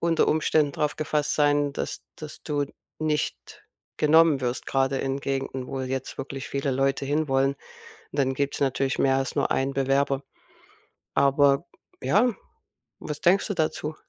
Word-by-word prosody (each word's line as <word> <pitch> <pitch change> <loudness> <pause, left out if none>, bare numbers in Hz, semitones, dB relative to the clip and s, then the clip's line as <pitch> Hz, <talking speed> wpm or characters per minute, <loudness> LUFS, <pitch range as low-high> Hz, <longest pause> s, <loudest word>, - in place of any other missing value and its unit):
unter 165 -1 +2
Umständen 155 -2 +2
drauf 150 -1 -1
gefasst 150 -1 0
sein, 145 -1 +2
dass - - -4
dass 155 -1 -9
du 145 -2 -1 0.3
nicht 155 -1 -3 0.3
genommen 155 -1 +5
wirst, 125 0 -2
grade 135 0 +1
in 135 0 -2
Gegenden, 135 -2 -3
wo 135 - -4
jetzt 130 0 -4
wirklich 135 0 -5
viele 140 0 -1
Leute 135 +1 +1
hin 150 +2 0
wollen. 135 +1 +2 0.6
Dann 135 -2 +1
gibt's 140 +1 -2
natürlich 135 -1 0
mehr 135 -1 +3
als 135 - -3
nur - - +1
einen 135 +1 0
Bewerber. 135 0 +1 0.9
Aber, 140 0 +4 0.4
ja, 210 - +3 0.7
was 150 -1 -5
denkst 185 +3 +4
du 205 - -1
dazu? 155 -1 -1
140 Hz, 150 wpm, -26 LUFS, 135-150 Hz, 0.9 s, genommen